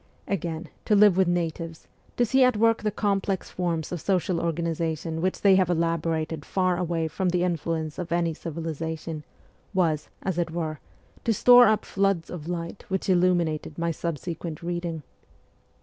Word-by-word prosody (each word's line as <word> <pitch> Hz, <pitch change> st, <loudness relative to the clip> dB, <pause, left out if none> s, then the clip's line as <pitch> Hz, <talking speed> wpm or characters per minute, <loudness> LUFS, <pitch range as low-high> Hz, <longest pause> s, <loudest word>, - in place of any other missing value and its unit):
Again, 170 Hz, -3 st, -3 dB, 0.2 s
to 210 Hz, -, +3 dB
live 205 Hz, -2 st, +6 dB
with 190 Hz, -1 st, +3 dB
natives, 165 Hz, -2 st, -2 dB, 0.3 s
to 245 Hz, -, +4 dB
see 265 Hz, +3 st, +4 dB
at 250 Hz, -3 st, +4 dB
work 225 Hz, +1 st, +3 dB
the 215 Hz, -, +1 dB
complex 200 Hz, -2 st, -1 dB
forms 170 Hz, -3 st, -2 dB
of 175 Hz, -3 st, -4 dB
social 180 Hz, -3 st, 0 dB
organization 165 Hz, -1 st, -2 dB
which 185 Hz, +1 st, -1 dB
they 200 Hz, -1 st, +6 dB
have 185 Hz, -2 st, +3 dB
elaborated 165 Hz, -2 st, 0 dB
far 185 Hz, +1 st, +1 dB
away 170 Hz, -2 st, -1 dB
from 185 Hz, +3 st, -1 dB
the 175 Hz, 0 st, +1 dB
influence 165 Hz, -3 st, -2 dB
of 175 Hz, -2 st, -5 dB
any 170 Hz, -1 st, +1 dB
civilization, 160 Hz, -1 st, -5 dB, 0.5 s
was, 160 Hz, -5 st, +1 dB
as 185 Hz, -2 st, -1 dB
it 170 Hz, -1 st, 0 dB
were, 160 Hz, -2 st, -3 dB, 0.4 s
to 230 Hz, -, +2 dB
store 245 Hz, +3 st, +8 dB
up 215 Hz, 0 st, +2 dB
floods 195 Hz, -4 st, 0 dB
of 165 Hz, -3 st, -7 dB
light 170 Hz, +2 st, -4 dB
which 190 Hz, 0 st, -2 dB
illuminated 175 Hz, -4 st, +1 dB
my 170 Hz, 0 st, 0 dB
subsequent 165 Hz, 0 st, -5 dB
reading. 170 Hz, -2 st, -3 dB
170 Hz, 160 wpm, -26 LUFS, 165-185 Hz, 0.5 s, store